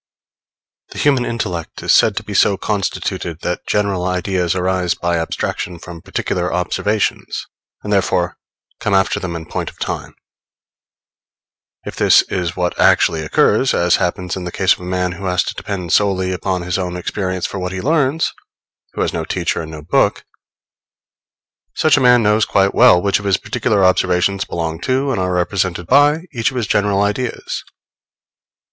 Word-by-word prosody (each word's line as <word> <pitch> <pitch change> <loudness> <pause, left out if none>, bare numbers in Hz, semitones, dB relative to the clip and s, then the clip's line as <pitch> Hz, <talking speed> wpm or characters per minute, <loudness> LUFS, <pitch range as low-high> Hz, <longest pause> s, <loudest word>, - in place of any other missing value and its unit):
The - - -10
human 135 -4 +2
intellect 90 -8 -4
is - - +3
said - - +4
to - - -2
be - - -7
so 100 - +3
constituted 95 -5 -3
that 90 - -4
general 100 -3 0
ideas 90 -1 -1
arise 90 -1 0
by 85 -1 -1
abstraction 85 +1 -3
from 85 0 -10
particular 90 +1 -2
observations, 95 +4 -1 0.4
and 105 - -2
therefore 95 -3 +1 0.4
come 105 - 0
after 95 0 +2
them 85 -2 -4
in 80 -1 -6
point - - -4
of - - -17
time. - - -5 1.7
If - - -6
this - - +5
is 90 -2 -2
what 90 -1 -2
actually 80 - +4
occurs, 75 - +2
as 85 0 +3
happens 90 +1 -2
in 95 - -5
the 90 - -5
case 95 +1 +3
of - - -10
a - - -10
man 90 0 -1
who 95 +2 -7
has 90 0 +1
to - - -4
depend 90 -5 -4
solely 95 -2 +2
upon 90 0 -2
his 90 +2 -2
own 90 -1 -3
experience 95 0 -3
for 95 - -4
what 90 0 -3
he 95 - -4
learns 150 - +1 0.6
who - - -3
has - - 0
no - - -2
teacher - - -2
and 80 - -7
no 80 -2 -9
book, 75 - +1 1.5
such 155 -2 +4
a 145 - +1
man 125 -2 +5
knows 105 +1 +3
quite 100 0 +2
well 90 - +6
which 100 +2 +1
of 100 - -9
his 100 -1 +2
particular 110 -5 0
observations 95 +1 +2
belong 80 -1 -3
to 135 +2 0
and 115 - -1
are 90 0 -1
represented 90 0 -1
by 145 - +4
each 115 -3 +1
of 130 - -7
his 120 - 0
general 100 0 +1
ideas. 110 +5 -3
95 Hz, 175 wpm, -18 LUFS, 90-105 Hz, 1.7 s, well